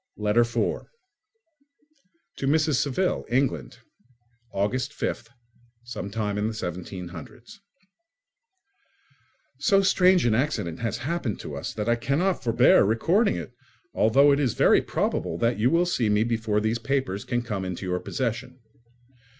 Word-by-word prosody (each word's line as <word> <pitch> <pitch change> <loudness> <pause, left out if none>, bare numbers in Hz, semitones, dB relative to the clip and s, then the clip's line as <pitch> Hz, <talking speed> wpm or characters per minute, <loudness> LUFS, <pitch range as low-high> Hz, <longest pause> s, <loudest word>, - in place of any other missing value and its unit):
Letter 105 +3 +3
4 115 0 -2 1.5
To 135 - -2
Mrs. 155 0 +2
Saville, 150 +7 -1
England. 115 - -1 0.7
August 115 +6 -1
5th, - - -4 0.6
17—. 105 - -5 2.0
So 195 -2 +3
strange 185 -3 +4
an 115 - +3
accident 110 - -1
has 115 -1 -2
happened 135 - -3
to - - -7
us - - -5
that 105 0 -3
I 120 - +4
cannot 155 +10 0
forbear 115 +1 +5
recording 165 - +2
it, 85 -2 -7 0.4
although 135 +7 +4
it 140 - +2
is 130 -6 0
very - - +4
probable 80 - -2
that 115 +3 0
you 120 +4 +3
will 170 +4 +3
see 125 -11 0
me 105 +1 +3
before 110 -2 0
these 110 +2 -1
papers 130 -5 -2
can 120 -1 -2
come 105 -5 -4
into 90 +1 -5
your 90 -1 -1
possession. 125 +2 -4
115 Hz, 125 wpm, -25 LUFS, 105-135 Hz, 2.0 s, forbear